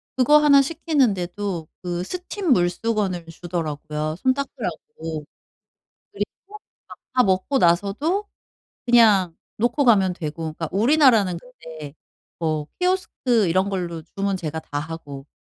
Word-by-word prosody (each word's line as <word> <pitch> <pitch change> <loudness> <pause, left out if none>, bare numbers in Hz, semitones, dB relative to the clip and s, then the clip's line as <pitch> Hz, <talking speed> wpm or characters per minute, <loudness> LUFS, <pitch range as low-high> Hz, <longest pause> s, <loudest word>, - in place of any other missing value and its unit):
그거 265 +4 +5
하나 290 -2 +6
시키는데도 205 - -1
그 175 -1 -3
스팀 360 - -1
물수건을 185 -1 0
주더라고요 155 -2 -4
손 260 +4 +2
닦으라고. 165 - -5 0.9
그리고 - - -3 0.2
막 425 +1 -11 0.5
다 255 - +5
먹고 190 +8 +1
나서도 205 - +1 0.6
그냥 205 -8 +5 0.2
놓고 240 +6 +1
가면 195 -6 +4
되고. 160 0 -5
그러니까 165 0 -5
우리나라는 225 - +4
근데 160 - -11 0.5
뭐 155 -3 -1
키오스크 320 - +1
이런 185 +3 +2
걸로 175 -4 -3
주문 195 +3 -2
제가 160 -3 -4
다 145 - -5
하고 145 -3 -7
190 Hz, 275 characters per minute, -23 LUFS, 165-255 Hz, 0.9 s, 하나